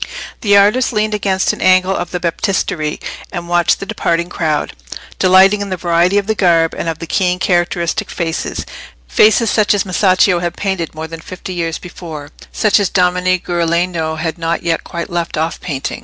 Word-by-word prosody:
The 205 -3 +4
artist 210 +6 +3
leaned 215 -1 0
against 195 -2 +1
an - - -8
angle 185 +1 +4
of - - -3
the 180 - -3
Baptistery 170 -3 -1 0.3
and 170 0 -5
watched 175 -1 +2
the - - -5
departing 170 -2 -1
crowd, 155 -4 -1 0.5
delighting 190 +2 +5
in 200 - -4
the 185 - -2
variety 175 +3 +2
of 205 - +1
the 220 - 0
garb 170 -5 +2
and 165 - -3
of 165 - -3
the 165 - -6
keen 180 +1 0
characteristic 175 -2 0
faces—faces 170 - 0
such 210 -1 +3
as 205 - 0
Masaccio 185 -1 +3
had 175 0 -3
painted 190 -6 -3
more 160 +1 -5
than 165 0 -9
fifty 185 +2 -8
years 165 -2 -2
before: 160 -5 -9 0.2
such 215 -1 +3
as 200 - +1
Domenico 180 -1 +1
Ghirlandajo 170 -1 0
had 165 +1 -3
not 165 0 -1
yet 165 -1 0
quite 170 0 -6
left 170 -2 -2
off 160 +2 -2
painting. 140 -7 -4
175 Hz, 180 wpm, -16 LUFS, 165-190 Hz, 0.5 s, delighting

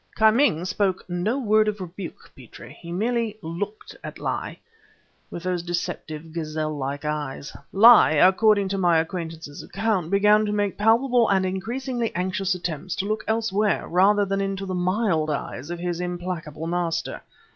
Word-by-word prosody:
"Ki 220 0 +6
Ming 215 - +2
spoke 185 0 -1
no 180 +8 -1
word 215 -4 +3
of 210 -1 -2
rebuke, 180 0 -8
Petrie; - - -13
he 170 - -8
merely 225 +3 -1
looked 200 - -6
at - - -7
Li, - - -4 0.7
with 170 - -7
those 180 -1 -1
deceptive, 165 -2 -5
gazelle 155 -1 -3
like 140 +1 -4
eyes. 150 -2 -4 0.2
Li, 215 -6 +7
according 200 +4 +4
to 195 0 -2
my 175 -3 +4
acquaintance 160 -3 -4
account, 195 -4 -1
began 210 +2 +4
to 210 - -1
make 205 -2 0
palpable 230 +2 +3
and 190 -1 +2
increasingly 235 +6 -3
anxious 185 +1 -1
attempts 175 0 -4
to 195 - -2
look 215 +1 -2
anywhere 215 -2 0
rather 200 +3 +4
than 195 0 -1
into 195 0 -3
the 190 - -4
mild 180 -3 0
eyes 145 -1 -4
of 175 - -4
his 175 0 -3
implacable 175 -3 -5
master. 165 -1 -2
185 Hz, 155 wpm, -24 LUFS, 170-210 Hz, 0.7 s, Li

